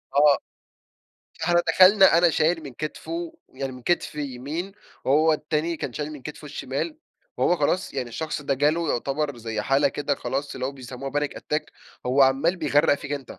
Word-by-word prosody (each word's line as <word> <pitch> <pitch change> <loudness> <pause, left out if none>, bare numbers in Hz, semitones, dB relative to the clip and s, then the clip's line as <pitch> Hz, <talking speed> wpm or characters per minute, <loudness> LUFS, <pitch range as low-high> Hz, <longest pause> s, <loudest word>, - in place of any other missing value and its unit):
آه، 145 0 +6 1.1
إحنا 175 +1 +3
دخلنا، 190 +1 +7
أنا 175 0 +5
شايل 160 +1 +1
من 140 -3 -8
كتفُه، 165 +4 -5
يعني 135 0 -5
من 125 -1 -11
كتف 175 +1 0
يمين، 150 +6 -4 0.3
وهو 155 +4 +4
التاني 155 +2 -1
كان 135 - -4
شايل 150 +4 -4
من 145 -4 -10
كتفُه 150 +2 -8
الشمال، 150 - -4 0.4
وهو 175 - +3
خلاص 165 +2 0
يعني 130 -3 -2
الشخص 150 +5 -4
ده 140 -1 0
جاله 150 +4 +1
يعتبر 140 +2 -2
زي 110 -2 -3
حالة 135 +5 +3
كده 145 +1 -1
خلاص 140 +1 -3
اللي 130 0 -2
هو 135 - -4
بيسموها 130 0 -7
Panic 145 0 0
Attack، 150 +1 -1 0.4
هو 130 +2 +4
عمال 135 +7 +3
بيغرّق 150 -2 +3
فيك 140 0 -6
أنت 140 -3 -6
145 Hz, 175 wpm, -25 LUFS, 135-160 Hz, 1.1 s, دخلنا